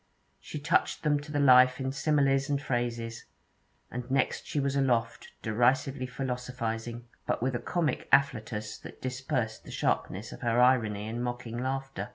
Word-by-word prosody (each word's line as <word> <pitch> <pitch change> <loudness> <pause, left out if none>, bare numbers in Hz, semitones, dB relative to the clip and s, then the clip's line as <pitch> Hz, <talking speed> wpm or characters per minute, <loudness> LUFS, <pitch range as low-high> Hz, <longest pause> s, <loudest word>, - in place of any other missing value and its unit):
She - - -7
touched 145 +1 +1
them 150 -2 +3
to 150 +1 -9
the 145 - 0
life 130 -2 +6
in 130 0 -1
similes 135 -1 +2
and 140 -1 +1
phrases; 120 -3 -3 0.7
and 125 +1 -5
next 135 0 0
she 150 - -1
was 140 0 0
aloft, 120 -4 +1 0.2
derisively 130 +3 +1
philosophizing, 125 -3 -4 0.2
but - - 0
with 130 +1 +1
a 120 - -1
comic 170 +1 -1
afflatus 115 -6 +1
that - - -11
dispersed 125 -3 -2
the - - -12
sharpness 105 +4 -1
of - - -10
her 120 0 +2
irony 110 -5 +3
in 115 +2 -3
mocking 120 -1 -4
laughter. 135 0 -3
125 Hz, 160 wpm, -29 LUFS, 115-135 Hz, 0.7 s, life